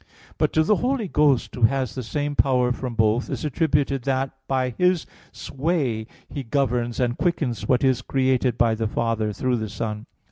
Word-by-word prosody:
But -, -, +2 dB
to 160 Hz, -, +4 dB
the 205 Hz, +5 st, +3 dB
Holy 250 Hz, -4 st, 0 dB
Ghost, 150 Hz, -6 st, +2 dB
Who 125 Hz, -, -7 dB
has 130 Hz, +2 st, +2 dB
the 130 Hz, -, -4 dB
same 145 Hz, +4 st, -3 dB
power 125 Hz, -3 st, +3 dB
from 125 Hz, -1 st, -4 dB
both, 110 Hz, +2 st, +2 dB
is -, -, -3 dB
attributed 145 Hz, -2 st, +1 dB
that 135 Hz, 0 st, 0 dB, 0.2 s
by 130 Hz, -2 st, 0 dB
His 180 Hz, -2 st, +3 dB, 0.3 s
sway 135 Hz, -7 st, -2 dB, 0.2 s
He 145 Hz, -, -5 dB
governs, 120 Hz, -2 st, -1 dB
and 120 Hz, -1 st, +1 dB
quickens 150 Hz, -9 st, -1 dB
what 125 Hz, -1 st, +2 dB
is 130 Hz, -2 st, +3 dB
created 130 Hz, -2 st, +1 dB
by 115 Hz, -1 st, +3 dB
the 110 Hz, 0 st, -1 dB
Father 110 Hz, -1 st, -1 dB
through 125 Hz, +3 st, 0 dB
the 110 Hz, -2 st, -4 dB
Son. 105 Hz, +1 st, -4 dB
130 Hz, 180 wpm, -23 LUFS, 115-145 Hz, 0.3 s, to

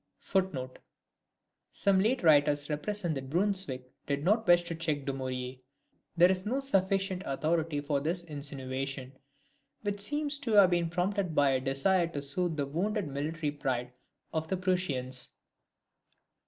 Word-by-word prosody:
[Some 195 Hz, -1 st, +3 dB
late 225 Hz, +5 st, +1 dB
writers 145 Hz, -1 st, +4 dB
represent 175 Hz, +3 st, -2 dB
that 135 Hz, -2 st, -5 dB
Brunswick 170 Hz, -8 st, 0 dB
did 140 Hz, 0 st, -1 dB
not 215 Hz, +6 st, +2 dB
wish 175 Hz, 0 st, +6 dB
to 170 Hz, -1 st, -4 dB
check 155 Hz, -4 st, -2 dB
Dumouriez. 130 Hz, -1 st, -4 dB, 0.6 s
There 175 Hz, +2 st, +7 dB
is 185 Hz, 0 st, -1 dB
no 245 Hz, +7 st, -1 dB
sufficient 195 Hz, -7 st, +1 dB
authority 155 Hz, +1 st, 0 dB
for 145 Hz, -1 st, 0 dB
this 170 Hz, +5 st, -2 dB
insinuation, 135 Hz, -3 st, -5 dB, 0.7 s
which 205 Hz, -1 st, -2 dB
seems 290 Hz, +6 st, -2 dB
to 235 Hz, -6 st, -2 dB
have 200 Hz, -3 st, +7 dB
been 175 Hz, -1 st, +2 dB
first 165 Hz, +2 st, -7 dB
prompted 185 Hz, -2 st, 0 dB
by 140 Hz, -1 st, +4 dB
a 130 Hz, -, +2 dB
desire 145 Hz, +7 st, +2 dB
to 145 Hz, -4 st, -5 dB
soothe 160 Hz, +3 st, -1 dB
the 145 Hz, -, 0 dB
wounded 185 Hz, +5 st, -1 dB
military 150 Hz, +2 st, -2 dB
pride 130 Hz, -4 st, -2 dB, 0.4 s
of 160 Hz, 0 st, -1 dB
the 190 Hz, -, -1 dB
Prussians. 145 Hz, -9 st, -1 dB
165 Hz, 140 wpm, -30 LUFS, 140-190 Hz, 0.7 s, There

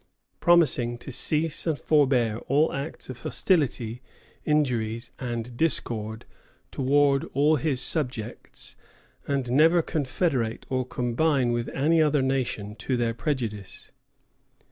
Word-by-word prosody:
promising 150 Hz, -8 st, +3 dB
to 130 Hz, -, -9 dB
"cease 155 Hz, +5 st, 0 dB
and 160 Hz, -3 st, +1 dB
forbear 130 Hz, -8 st, +2 dB
all 145 Hz, +4 st, +2 dB
acts 140 Hz, +4 st, -5 dB
of 130 Hz, -2 st, -8 dB
hostility, 125 Hz, -, 0 dB, 0.4 s
injuries, 120 Hz, -6 st, 0 dB
and 120 Hz, -1 st, -4 dB
discord 115 Hz, -7 st, -1 dB, 0.5 s
towards 140 Hz, +1 st, +2 dB
all 150 Hz, +3 st, +3 dB
his 135 Hz, -1 st, 0 dB
subjects, 125 Hz, -8 st, -2 dB, 0.5 s
and 135 Hz, -3 st, -1 dB
never 165 Hz, +5 st, +5 dB
confederate 140 Hz, -6 st, -1 dB
or 130 Hz, -1 st, +1 dB
combine 125 Hz, +2 st, +1 dB
with 120 Hz, 0 st, -2 dB
any 160 Hz, +4 st, +2 dB
other 150 Hz, -3 st, +2 dB
nation 125 Hz, -6 st, -2 dB
to 125 Hz, +4 st, -2 dB
their 115 Hz, -1 st, 0 dB
prejudice." 115 Hz, -6 st, -4 dB
130 Hz, 115 wpm, -26 LUFS, 120-150 Hz, 0.5 s, never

